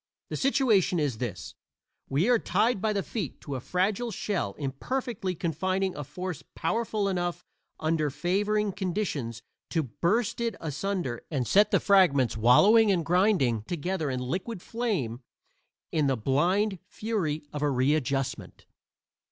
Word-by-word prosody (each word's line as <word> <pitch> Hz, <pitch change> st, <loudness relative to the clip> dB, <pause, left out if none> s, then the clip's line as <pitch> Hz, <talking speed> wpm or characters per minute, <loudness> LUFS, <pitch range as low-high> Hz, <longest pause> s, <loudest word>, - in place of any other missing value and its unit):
The -, -, -1 dB
situation 230 Hz, -10 st, +3 dB
is 140 Hz, -7 st, -1 dB
this: 100 Hz, -9 st, -5 dB, 0.6 s
we 150 Hz, +9 st, +2 dB
are 245 Hz, -2 st, +4 dB
tied 225 Hz, -3 st, +1 dB
by 220 Hz, -, +1 dB
the 200 Hz, -2 st, -1 dB
feet 195 Hz, -, -5 dB
to 140 Hz, -, -6 dB
a 130 Hz, -, -2 dB
fragile 190 Hz, -, 0 dB
shell 190 Hz, -, -2 dB
imperfectly 185 Hz, -, -3 dB
confining 185 Hz, +4 st, -1 dB
a 150 Hz, -, -4 dB
force 180 Hz, +3 st, -5 dB
powerful 220 Hz, -3 st, -1 dB
enough 175 Hz, -2 st, -2 dB, 0.4 s
under 155 Hz, -1 st, +1 dB
favoring 200 Hz, +8 st, 0 dB
conditions, 175 Hz, -, -3 dB, 0.3 s
to 160 Hz, -, 0 dB
burst 185 Hz, -, 0 dB
it 230 Hz, -2 st, -1 dB
asunder 160 Hz, -4 st, -3 dB
and 130 Hz, -6 st, -1 dB
set 205 Hz, +2 st, +5 dB
the -, -, +3 dB
fragments 165 Hz, -, +4 dB
wallowing 200 Hz, -, +6 dB
and 170 Hz, -4 st, +1 dB
grinding 175 Hz, -, +3 dB
together 175 Hz, -1 st, -2 dB
in 130 Hz, -1 st, -2 dB
liquid 180 Hz, -, -3 dB
flame, 185 Hz, -, -2 dB, 0.7 s
in 150 Hz, -3 st, +2 dB
the 135 Hz, -2 st, +1 dB
blind 180 Hz, -, +1 dB
fury 205 Hz, -8 st, -2 dB
of 150 Hz, -, -4 dB
a 150 Hz, -, +2 dB
readjustment. 135 Hz, -1 st, -1 dB
175 Hz, 140 wpm, -28 LUFS, 140-205 Hz, 0.7 s, wallowing